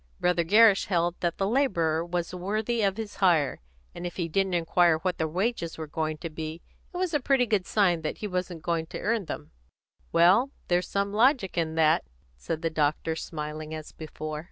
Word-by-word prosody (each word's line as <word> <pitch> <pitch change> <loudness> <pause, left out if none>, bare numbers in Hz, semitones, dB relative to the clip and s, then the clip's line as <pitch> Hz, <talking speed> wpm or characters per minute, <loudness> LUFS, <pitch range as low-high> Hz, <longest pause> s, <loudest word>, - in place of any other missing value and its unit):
Brother 175 -1 +2
Gerrish 210 +3 +5
held 175 -2 +1
that 170 -1 -1
the 195 - 0
labourer 170 - +1
was 175 0 -3
worthy 215 +6 -1
of 200 -1 +1
his 220 -2 -6
hire, 165 -8 +3 0.3
and - - -8
if 175 -1 -5
he 175 -3 -2
didn't 190 +2 0
inquire 170 0 +3
what 180 +2 -2
his 160 - +1
wages 180 0 -2
were 160 - -4
going 155 +1 -3
to 165 +2 -6
be, 160 +1 -6 0.3
it 355 - -6
was 365 -2 -1
a 295 - +3
pretty 265 -1 +2
good 210 -5 0
sign 180 -6 +2
that 155 - -3
he 210 - -4
wasn't 180 -3 -4
going 165 -1 -1
to - - -7
earn 220 -2 0
them." 75 - -7 0.6
"Well, 180 +10 +5 0.2
there 175 0 +4
was 180 - -6
some 200 0 -1
logic 235 -2 +3
in 160 -2 -1
that," 160 -1 +3 0.3
said 110 - -5
the 165 - 0
doctor, 155 +1 0
smiling 155 -1 -5
as 155 -1 -8
before. 155 -1 -6
175 Hz, 205 wpm, -27 LUFS, 160-200 Hz, 0.6 s, Gerrish